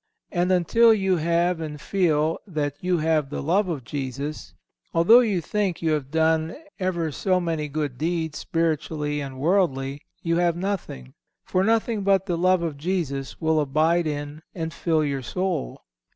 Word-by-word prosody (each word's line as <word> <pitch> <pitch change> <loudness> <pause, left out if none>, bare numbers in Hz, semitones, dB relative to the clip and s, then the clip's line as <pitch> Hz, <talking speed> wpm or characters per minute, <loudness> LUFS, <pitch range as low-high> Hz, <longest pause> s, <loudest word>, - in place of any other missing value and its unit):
And 180 0 +1
until 225 +6 +5
you 190 -3 +1
have 170 +1 +1
and 150 -2 -5
feel 160 -3 +1
that 150 -6 -2
you 180 -1 +1
have 155 -3 +1
the - - -4
love 185 +6 +2
of 150 -7 -3
Jesus, 140 +3 -5 0.4
although 180 +9 +7
you 210 -8 +1
think 195 +1 -1
you 160 - +2
have 145 -4 -1
done 160 +1 +1 0.2
ever 170 -4 -1
so 185 +6 +1
many 165 -4 -2
good 145 -4 -3
deeds, 160 -2 -2
spiritually 155 -2 -1
and 135 -2 -7
worldly, 140 -5 +1 0.2
you 165 0 +1
have 175 -1 +2
nothing, 175 - -4 0.3
for 185 - +1
nothing 225 0 +1
but 195 -1 +2
the 180 -3 -1
love 185 +1 +2
of 160 -4 -3
Jesus 145 -5 -3
will 160 -1 +2
abide 155 +4 +2
in 145 0 -4
and 165 -2 -4
fill 160 0 +1
your 140 -2 -2
soul. 180 - -3
165 Hz, 165 wpm, -24 LUFS, 150-180 Hz, 0.4 s, although